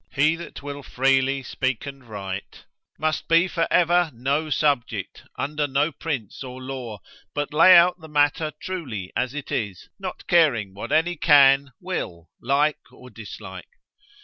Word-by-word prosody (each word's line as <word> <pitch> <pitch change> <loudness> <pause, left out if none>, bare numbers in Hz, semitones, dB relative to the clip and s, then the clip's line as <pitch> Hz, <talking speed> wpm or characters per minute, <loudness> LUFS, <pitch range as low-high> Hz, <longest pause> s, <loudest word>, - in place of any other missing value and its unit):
He 150 +4 +3
that 170 -5 -9
will 145 0 -6
freely 135 +1 +1
speak 130 0 -2
and 135 -1 -9
write, 100 -4 -7 0.3
must 155 0 -1
be 165 +2 +4
for 165 -2 -1
ever 175 -1 +3
no 140 +6 -1
subject, 145 -4 -1 0.2
under 150 +1 -1
no 145 +3 +1
prince 140 -7 -5
or 130 0 -8
law, 130 -6 -7 0.3
but 145 0 -2
lay 175 +4 +8
out 180 +1 +4
the 160 - -11
matter 150 +1 +2
truly 130 - -5
as 130 +2 -1
it 145 - -6
is, 100 -5 -3
not 185 -2 -6
caring 125 - +3
what 100 - -7
any 165 +3 +2
can, 140 -2 +5
will, 85 - -5
like 145 +4 +1
or 125 0 -15
dislike. 110 -1 -10
140 Hz, 150 wpm, -24 LUFS, 125-155 Hz, 0.3 s, lay